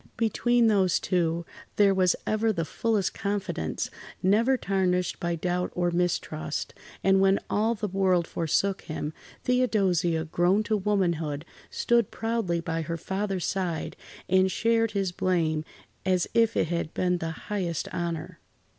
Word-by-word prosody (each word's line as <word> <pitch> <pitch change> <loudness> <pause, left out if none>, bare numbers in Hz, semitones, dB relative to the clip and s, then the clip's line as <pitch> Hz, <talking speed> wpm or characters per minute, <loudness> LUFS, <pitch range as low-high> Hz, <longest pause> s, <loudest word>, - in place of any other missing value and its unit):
Between 240 +1 +2
those 195 -5 +3
two, 170 -2 0 0.3
there 200 -1 +5
was 185 -1 +3
ever 215 +1 +1
the 165 -6 -2
fullest 215 +3 0
confidence, 200 - -3 0.3
never 225 +8 +4
tarnished 185 -4 0
by 170 0 -1
doubt 180 +2 -1
or 175 0 +1
mistrust, 170 -3 -2 0.3
and 195 +1 +4
when 195 0 +4
all 220 +3 +2
the 210 -1 -3
world 185 -2 +2
forsook 185 +4 0
him, 155 -1 -5 0.3
Theodosia, 190 -10 +2
grown 175 +5 +2
to 215 0 0
womanhood, 170 -7 0 0.2
stood 235 -3 +2
proudly 225 -7 -1
by 165 0 -2
her 165 +1 -3
father's 190 +1 -2
side 180 -5 -2 0.3
and 190 +1 +3
shared 225 +2 +1
his 195 -3 0
blame 165 -4 0 0.4
as 185 -2 +1
if 230 -1 +3
it 160 - +1
had 170 -2 -2
been 180 -1 +1
the 165 - -3
highest 170 0 -3
honour. 170 -2 -4
185 Hz, 140 wpm, -27 LUFS, 170-210 Hz, 0.4 s, there